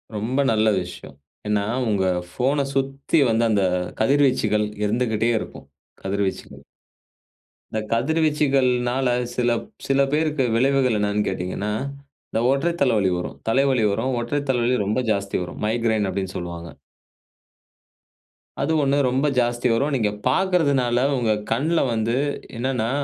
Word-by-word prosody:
ரொம்ப 115 Hz, +6 st, -2 dB
நல்ல 110 Hz, 0 st, +2 dB
விஷயம். 90 Hz, -5 st, -9 dB, 0.3 s
ஏன்னா, 105 Hz, -1 st, +1 dB, 0.3 s
உங்க 100 Hz, -3 st, +1 dB, 0.3 s
ஃபோன 140 Hz, +6 st, 0 dB
சுத்தி 135 Hz, +3 st, 0 dB
வந்து 115 Hz, +1 st, +2 dB
அந்த 105 Hz, -3 st, +2 dB, 0.4 s
கதிர்வீச்சுகள் 120 Hz, -5 st, +2 dB, 0.2 s
இருந்துகிட்டே 110 Hz, +1 st, 0 dB
இருக்கும், 70 Hz, -, -9 dB, 0.4 s
கதிர்வீச்சுகள். 95 Hz, 0 st, -3 dB, 1.1 s
இந்த 110 Hz, -, -1 dB
கதிர்வீச்சுகள்னால, 135 Hz, -2 st, +1 dB, 0.3 s
சில 120 Hz, -1 st, +1 dB, 0.4 s
சில 135 Hz, 0 st, +3 dB
பேருக்கு 155 Hz, -2 st, +1 dB
விளைவுகள் 130 Hz, -1 st, +2 dB
என்னென்னு 105 Hz, 0 st, 0 dB
கேட்டீங்கன்னா, 90 Hz, +3 st, -3 dB, 0.6 s
இந்த 110 Hz, -, 0 dB
ஒற்றை 145 Hz, +5 st, +1 dB
தலைவலி 105 Hz, -8 st, +3 dB
வரும், 90 Hz, -, -5 dB
தலைவலி 130 Hz, 0 st, +2 dB
வரும், 115 Hz, +6 st, -1 dB
ஒற்றை 145 Hz, +5 st, -1 dB
தலைவலி 125 Hz, -1 st, +2 dB
ரொம்ப 105 Hz, +5 st, 0 dB
ஜாஸ்தி 100 Hz, -1 st, -1 dB
வரும், 90 Hz, -, -8 dB
"மைக்ரேன்" 110 Hz, -2 st, +1 dB
அப்டின்னு 95 Hz, -1 st, -4 dB
சொல்லுவாங்க. 85 Hz, -1 st, -6 dB, 1.9 s
அது -, -, 0 dB
1 140 Hz, 0 st, +2 dB
ரொம்ப 130 Hz, +4 st, +1 dB
ஜாஸ்தி 120 Hz, 0 st, +1 dB
வரும், 140 Hz, +6 st, 0 dB
நீங்க 110 Hz, -5 st, +1 dB, 0.2 s
பாக்குறதுனால, 140 Hz, -6 st, +2 dB, 0.2 s
உங்க 115 Hz, -3 st, +1 dB, 0.2 s
கண்ல 155 Hz, +9 st, +1 dB
வந்து 115 Hz, +1 st, 0 dB, 0.4 s
என்னான்னா, 120 Hz, -1 st, -1 dB
120 Hz, 120 wpm, -22 LUFS, 105-135 Hz, 1.9 s, சில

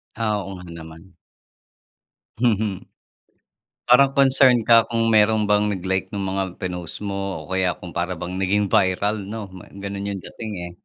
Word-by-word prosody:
Ah, 110 Hz, -2 st, 0 dB
oo 95 Hz, 0 st, -7 dB
nga 90 Hz, -, -10 dB
naman. 80 Hz, +2 st, -12 dB, 1.2 s
Mhm. 110 Hz, -3 st, +2 dB, 1.2 s
Parang 135 Hz, +2 st, +6 dB
concern 135 Hz, -3 st, +5 dB
ka 115 Hz, 0 st, +5 dB
kung 115 Hz, -1 st, 0 dB
meron 110 Hz, -1 st, +3 dB
bang 105 Hz, 0 st, +3 dB
nag-like 95 Hz, 0 st, -3 dB
nung 100 Hz, -, -2 dB
mga 95 Hz, -1 st, -2 dB
pinost 90 Hz, -1 st, -5 dB
mo 100 Hz, -1 st, -3 dB, 0.3 s
o -, -, -16 dB
kaya 95 Hz, -1 st, +1 dB
kung 90 Hz, -, -8 dB
para 90 Hz, +2 st, -1 dB
bang 90 Hz, +1 st, -6 dB
naging 100 Hz, +2 st, +1 dB
viral 100 Hz, +4 st, +2 dB
no 105 Hz, 0 st, -6 dB
ma 90 Hz, -, -12 dB, 0.2 s
ganun 100 Hz, 0 st, -5 dB
yung 95 Hz, -, -6 dB
dating 110 Hz, +3 st, -8 dB, 0.2 s
eh. -, -, -11 dB
100 Hz, 160 wpm, -22 LUFS, 95-110 Hz, 1.2 s, Parang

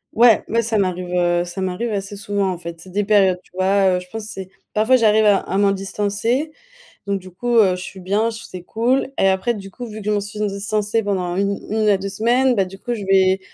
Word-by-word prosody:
Ouais, 230 Hz, -1 st, +6 dB
mais 230 Hz, +2 st, +1 dB
ça 220 Hz, -1 st, 0 dB
m'arrive, 180 Hz, -2 st, -2 dB
heu, 175 Hz, -1 st, +2 dB
ça 175 Hz, +2 st, -6 dB
m'arrive 190 Hz, +6 st, -2 dB
assez 200 Hz, 0 st, -4 dB
souvent, 200 Hz, -1 st, -1 dB
en 180 Hz, -, -4 dB
fait. 170 Hz, -1 st, -8 dB
C'est 185 Hz, -, -13 dB
des 205 Hz, +3 st, 0 dB
périodes, 195 Hz, -3 st, +3 dB
tu -, -, -27 dB
vois, 190 Hz, 0 st, +2 dB
heu, -, -, -2 dB
je 180 Hz, -, -12 dB
pense 220 Hz, +1 st, -6 dB
c'est 190 Hz, -3 st, -7 dB, 0.2 s
parfois, 220 Hz, +5 st, +4 dB
j'arrive 220 Hz, -2 st, +4 dB
à 205 Hz, -2 st, +5 dB
à 195 Hz, -, -3 dB
m'en 200 Hz, -1 st, +4 dB
distancer, 205 Hz, +8 st, -1 dB, 0.6 s
donc 200 Hz, -1 st, -1 dB
du 185 Hz, -, -12 dB
coup, 240 Hz, +7 st, -1 dB
heu, 195 Hz, -5 st, +5 dB
je 180 Hz, -, -6 dB
suis 190 Hz, -, -9 dB
bien, 205 Hz, +5 st, 0 dB
c'est 220 Hz, -5 st, -9 dB
cool. 245 Hz, +8 st, 0 dB
Et 195 Hz, -, +4 dB
après, 190 Hz, +5 st, +1 dB
du 195 Hz, -2 st, -9 dB
coup, 245 Hz, +5 st, -8 dB
vu 215 Hz, -1 st, -8 dB
que -, -, -10 dB
je -, -, +3 dB
m'en 205 Hz, -1 st, +1 dB
suis 205 Hz, +1 st, -8 dB
distancée 210 Hz, +2 st, -1 dB
pendant 200 Hz, -3 st, -1 dB
un 175 Hz, 0 st, -3 dB
une 200 Hz, +2 st, -1 dB
à 200 Hz, -, +5 dB
2 195 Hz, +1 st, -5 dB
semaines, 245 Hz, +6 st, +2 dB
bah, 195 Hz, -4 st, +1 dB
du 195 Hz, +1 st, -11 dB
coup, 240 Hz, -, -4 dB
je 215 Hz, -, -6 dB
vais 190 Hz, 0 st, +4 dB
200 Hz, 250 wpm, -20 LUFS, 190-220 Hz, 0.6 s, Ouais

